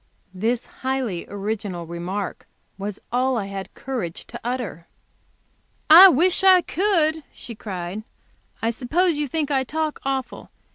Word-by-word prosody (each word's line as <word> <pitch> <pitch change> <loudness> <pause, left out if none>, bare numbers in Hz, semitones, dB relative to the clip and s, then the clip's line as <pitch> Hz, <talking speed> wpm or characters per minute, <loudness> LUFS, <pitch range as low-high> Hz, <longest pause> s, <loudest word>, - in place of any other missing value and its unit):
This 225 +5 -1 0.2
highly 260 -9 -2
original 200 -3 -4
remark 175 +4 -5 0.3
was 200 +1 -5
all 255 +1 +1
I 205 - -2
had 195 -1 -6
courage 230 -11 -5
to 240 - -9
utter. 235 -9 -4 1.0
"I 355 +5 +12
wish 360 +3 +3
I 375 -1 +7
could," 330 -5 +1
she 235 - -9
cried. 190 -2 -5 0.6
"I 225 - +2
suppose 315 +8 +1
you 295 - -1
think 300 +1 -2
I 265 -1 +2
talk 310 +3 -3
awful. 270 -2 -3
245 Hz, 135 wpm, -23 LUFS, 200-300 Hz, 1.0 s, I